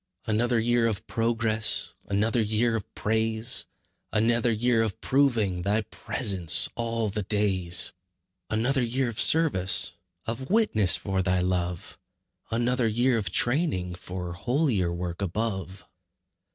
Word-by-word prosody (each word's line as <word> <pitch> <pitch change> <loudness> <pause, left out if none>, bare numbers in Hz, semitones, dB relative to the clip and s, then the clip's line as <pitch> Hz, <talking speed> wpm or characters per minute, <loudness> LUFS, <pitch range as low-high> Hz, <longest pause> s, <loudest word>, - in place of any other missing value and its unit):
Another 115 +2 0
year 120 0 +1
of 105 -4 -4
progress, 115 -1 0
Another 110 +4 0
year 110 +2 +1
of 110 - -6
praise; 110 +2 +1 0.4
Another 115 +2 +1
year 115 +1 +1
of 110 -4 -3
proving 115 -10 +1
Thy 105 +4 0
presence 100 - +3
'all 115 -2 -2
the 105 +2 -3
days.' 95 -3 +1 0.6
Another 120 +5 0
year 125 +1 -1
of 115 - -6
service, 145 - +3 0.3
Of 120 +4 -5
witness 190 - +3
for 95 -2 -2
Thy 90 0 0
love; 90 -1 -3 0.5
Another 120 +1 0
year 120 +3 +1
of 105 -4 -2
training 120 - +1
For 90 0 -7
holier 115 - -1
work 85 +1 -5
above. 95 -1 -4
110 Hz, 125 wpm, -26 LUFS, 95-120 Hz, 0.6 s, presence